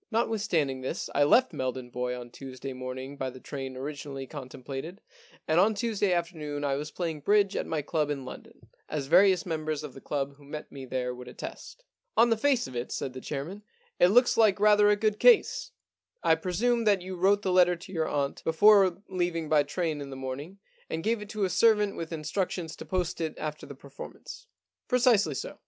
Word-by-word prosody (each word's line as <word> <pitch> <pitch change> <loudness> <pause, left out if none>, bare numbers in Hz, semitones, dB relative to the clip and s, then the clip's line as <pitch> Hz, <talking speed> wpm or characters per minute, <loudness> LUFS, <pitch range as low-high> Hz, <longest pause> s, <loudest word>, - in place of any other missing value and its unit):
Notwithstanding 205 - 0
this, 130 - -4
I 145 - +4
left 255 - +4
Meldon 130 -1 -4
Bois 125 0 -3
on 120 -1 -10
Tuesday 135 0 -7
morning 130 +2 -6
by 130 -1 -2
the 130 0 -11
train 135 -1 -6
origin 145 +1 -6
ally 135 -1 -5
contemplated, 135 +5 -7 0.5
and 160 +2 +3
on 215 +3 +4
Tuesday 210 -3 0
afternoon 160 -4 -2
I 140 -1 +1
was 145 +2 -3
playing 165 -2 -3
bridge 200 +5 +3
at - - -2
my 155 -2 -2
club 150 0 0
in 140 -3 -3
London, 130 - -11 0.2
as 150 -3 -2
various 185 +4 +5
members 155 -3 -2
of 145 -4 -7
the 135 - -12
club 140 -1 -3
who 145 - -18
met 150 +2 -8
me 135 -2 -8
there 125 -1 -2
would 125 0 -10
attest.' - - -9 0.2
* - - -49
On 235 0 +6
the - - +5
face 255 +2 +2
of 130 - -9
it,' 120 +1 -4
said 130 - -3
the 130 - -8
chairman, 155 +11 -5 0.2
* 475 0 -37
it 175 - +7
looks 245 +6 +4
like 215 -4 +4
rather 210 0 +5
a 210 - +5
good 215 0 0
case. - - +4 0.5
I - - +5
presume 225 +8 0
that 200 -4 +3
you 185 0 -6
wrote 200 +3 +3
the 190 - 0
letter 180 -1 +5
to 180 +2 -12
your 160 -2 0
aunt 140 -1 -2
before 195 +2 +5
leaving 175 -4 -2
by 155 -1 +5
train 155 +1 -2
in 140 - -7
the 135 - -7
morning, 135 +8 -6 0.3
and 160 0 -3
gave 225 +1 0
it 210 - -8
to 215 -1 -2
a 190 - +2
servant 210 +1 +3
with 165 0 -6
instructions 165 +1 -3
to - - -8
post 180 -3 -2
it 160 -1 -2
after 150 0 -5
the 140 - -9
performance.' 315 - -11 0.2
* - - -64
Precisely 235 - +3
so.' - - -6
160 Hz, 215 wpm, -28 LUFS, 140-205 Hz, 0.5 s, it